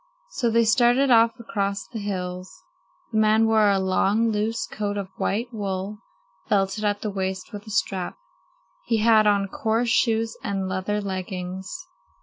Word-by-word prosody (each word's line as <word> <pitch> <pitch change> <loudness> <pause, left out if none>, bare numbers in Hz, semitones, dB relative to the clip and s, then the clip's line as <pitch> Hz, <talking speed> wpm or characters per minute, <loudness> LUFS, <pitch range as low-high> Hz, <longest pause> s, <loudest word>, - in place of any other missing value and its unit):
So 245 - 0
they 230 0 +3
started 245 +4 +4
off 230 -1 +4
across 200 -3 -2
the 230 - -7
hills. 185 -2 -5 0.5
The 220 - +1
man 215 +1 +4
wore 220 -2 +4
a 200 - +3
long, 195 +4 +2
loose 220 +2 -1
coat 205 -1 -3
of 195 -2 -4
white 235 +5 -2
wool, 200 -1 -4 0.5
belted 195 +1 +1
at 205 -1 0
the 210 - -3
waist 190 +1 -4
with 205 +1 -8
a - - -7
strap. 190 -2 -2 0.7
He 230 - +2
had 220 -1 +5
on 200 -1 +3
coarse 225 +4 0
shoes 225 -1 +1
and 195 -2 -2
leather 190 +3 -2
leggings. 185 -1 -5
210 Hz, 155 wpm, -24 LUFS, 195-225 Hz, 0.7 s, had